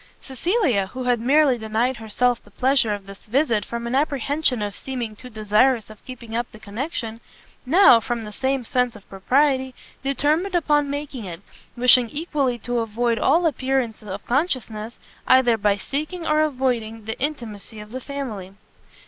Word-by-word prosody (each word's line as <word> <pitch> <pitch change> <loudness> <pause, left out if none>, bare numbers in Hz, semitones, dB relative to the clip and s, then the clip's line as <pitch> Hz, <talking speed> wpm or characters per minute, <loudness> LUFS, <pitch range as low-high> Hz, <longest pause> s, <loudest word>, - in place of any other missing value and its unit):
Cecilia, 270 - 0
who 255 +6 -6
had 245 -1 +2
merely 270 +1 +3
denied 225 +4 0
herself 230 +2 0
the - - -19
pleasure 255 +1 +2
of 205 -1 -4
this 195 0 -12
visit 230 -2 +1
from 235 0 -5
an 235 - -3
apprehension 280 -3 +1
of 205 -1 -4
seeming 245 -5 -5
too 250 +4 -11
desirous 215 +1 +2
of 215 - -15
keeping 235 -3 -8
up 240 +1 -2
the - - -12
connection, 225 +1 -5 0.5
now, 325 -5 +7
from 235 0 -3
the 210 - -7
same 265 +3 -1
sense 250 0 0
of 205 - -14
propriety, 260 +6 +1 0.3
determined 305 +7 +1
upon 295 -4 +2
making 285 -5 -5
it, 170 -1 -7 0.4
wishing 245 -1 +6
equally 285 -4 -1
to 240 +1 -2
avoid 230 +1 0
all 330 +5 +3
appearance 260 -6 0
of 200 -1 -7
consciousness, 240 -6 -2 0.3
either 255 -2 +5
by 205 -2 +1
seeking 310 - -4
or 305 -1 +2
avoiding 245 -7 -1
the 220 - -5
intimacy 230 -7 -5
of 210 0 -10
the 260 +1 -5
family. 225 -10 -6
245 Hz, 165 wpm, -23 LUFS, 220-275 Hz, 0.5 s, now